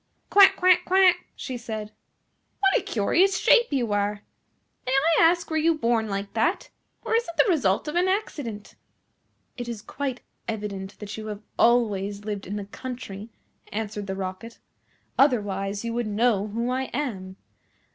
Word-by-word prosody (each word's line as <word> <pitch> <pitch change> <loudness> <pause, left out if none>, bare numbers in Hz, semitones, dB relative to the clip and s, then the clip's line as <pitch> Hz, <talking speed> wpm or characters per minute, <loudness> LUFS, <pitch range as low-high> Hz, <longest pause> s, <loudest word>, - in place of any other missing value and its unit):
"Quack, 395 -1 +8
quack, 365 0 +4
quack," 365 -1 +4
she 255 -2 -5
said. 220 -3 -6 0.7
"What 390 -1 +3
a - - -16
curious 365 - +2
shape 475 -1 +5
you 245 -6 0
are! 205 0 -1 0.6
May - - 0
I 310 +5 +3
ask 340 0 +3
were 315 - +1
you 320 +1 +2
born 230 -4 +1
like 200 0 -4
that, 325 - 0 0.3
or - - -2
is 465 - +3
it 335 - -9
the - - +5
result 270 - +1
of 300 - -3
an 355 +1 +3
accident?" 290 - -3 0.8
"It 240 -1 -5
is 220 -3 -6
quite 265 -3 -4 0.3
evident 205 -3 -5
that 210 0 -7
you 215 0 -6
have 210 0 -6 0.2
always 205 -4 +2
lived 205 -3 -4
in 200 - -4
the 205 -1 -4
country," 215 -2 -8 0.4
answered 210 -1 -4
the 190 - -3
Rocket, 190 +4 -6 0.6
"otherwise 205 -6 +1
you 230 - -2
would 240 -1 -1
know 215 -1 +1
who 235 +4 -2
I 260 +1 -1
am. 220 -9 -4
230 Hz, 165 wpm, -25 LUFS, 205-300 Hz, 0.8 s, Quack